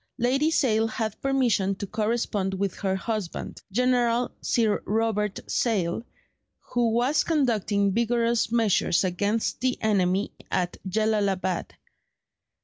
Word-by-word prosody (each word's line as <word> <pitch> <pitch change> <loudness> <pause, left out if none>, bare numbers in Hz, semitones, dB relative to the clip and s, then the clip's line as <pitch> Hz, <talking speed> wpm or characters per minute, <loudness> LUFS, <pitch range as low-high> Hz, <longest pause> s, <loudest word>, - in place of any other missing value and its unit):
'" - - -58
Lady 275 +4 +2
Sale 225 -8 +2
had 220 -1 -4
permission 245 -8 +1
to 200 - -5
correspond 210 -2 -1
with 195 0 -1
her 190 -2 -1
husband, 210 -2 -4
General 245 +1 +2
Sir 220 -3 +1
Robert 210 -2 0
Sale, 200 -4 0 0.6
who 240 -1 0
was 245 +6 +2
conducting 220 - +1
vigorous 235 +1 +1
measures 220 -6 +2
against 200 +6 -1
the 255 0 0
enemy 195 -2 +1 0.2
at 180 -1 -1
Jellalabad. 200 -3 0
220 Hz, 115 wpm, -26 LUFS, 195-235 Hz, 0.6 s, Lady